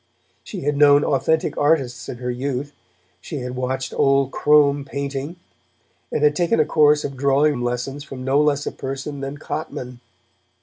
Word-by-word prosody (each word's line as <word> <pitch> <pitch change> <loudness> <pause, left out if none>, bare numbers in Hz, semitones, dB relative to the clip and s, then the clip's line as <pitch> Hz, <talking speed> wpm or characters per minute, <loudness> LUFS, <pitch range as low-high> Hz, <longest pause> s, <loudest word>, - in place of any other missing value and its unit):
She - - -7
had 145 +1 -1
known 145 0 +6
authentic 160 +4 +1
artists 135 -6 +1
in 125 - -6
her 125 0 -3
youth; 135 +3 -3 0.5
she 155 - -7
had 125 0 -5
watched 130 +1 -3
Old 135 -1 +2
Crome 145 -1 +3
painting, 140 +3 -5 0.8
and 150 - -1
had 150 0 +4
taken 170 -1 +1
a 155 - +4
course 150 -1 +4
of 140 - -4
drawing 140 0 +2
lessons 125 +4 -3
from 135 -2 -8
no 135 +2 +3
less 145 -1 +1
a - - -2
person 135 +2 -6
than 135 +1 -5
Cotman. 125 -5 -6
140 Hz, 165 wpm, -21 LUFS, 130-150 Hz, 0.8 s, known